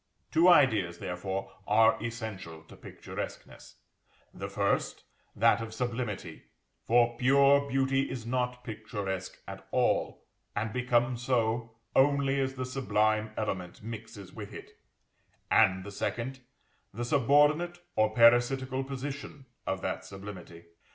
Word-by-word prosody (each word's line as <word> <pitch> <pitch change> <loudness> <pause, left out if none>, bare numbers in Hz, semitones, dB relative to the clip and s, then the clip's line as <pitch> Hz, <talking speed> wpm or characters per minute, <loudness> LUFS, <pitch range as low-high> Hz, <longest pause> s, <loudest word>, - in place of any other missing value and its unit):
Two 165 +3 +5
ideas, 110 - +4
therefore, 95 +2 -4 0.2
are 110 +2 +4
essential 105 -9 -6
to - - -15
picturesqueness, - - -8 0.6
the - - -6
first, - - -1 0.3
that 110 - +4
of 110 0 -6
sublimity 120 -4 -4 0.4
(for 120 0 +3
pure 140 +2 +4
beauty 135 0 +1
is 120 -4 -6
not 125 0 -2
picturesque 105 -4 -5
at - - -9
all, - - 0 0.3
and 105 +1 -2
becomes 125 -1 +1
so 115 -2 0 0.2
only 140 0 +3
as 135 0 -2
the 130 -1 -3
sublime 110 -4 +1
element 95 -3 -4
mixes 110 -3 -8
with 105 -2 -8
it), - - -10 0.8
and 95 -1 +4
the 100 - -8
second, 120 +6 -3 0.5
the 120 +4 -4
subordinate 145 +6 +3 0.2
or 110 0 +3
parasitical 125 +3 +4
position 135 0 -6 0.2
of 95 0 -1
that - - -2
sublimity. 95 -4 -10
115 Hz, 120 wpm, -30 LUFS, 105-130 Hz, 0.8 s, Two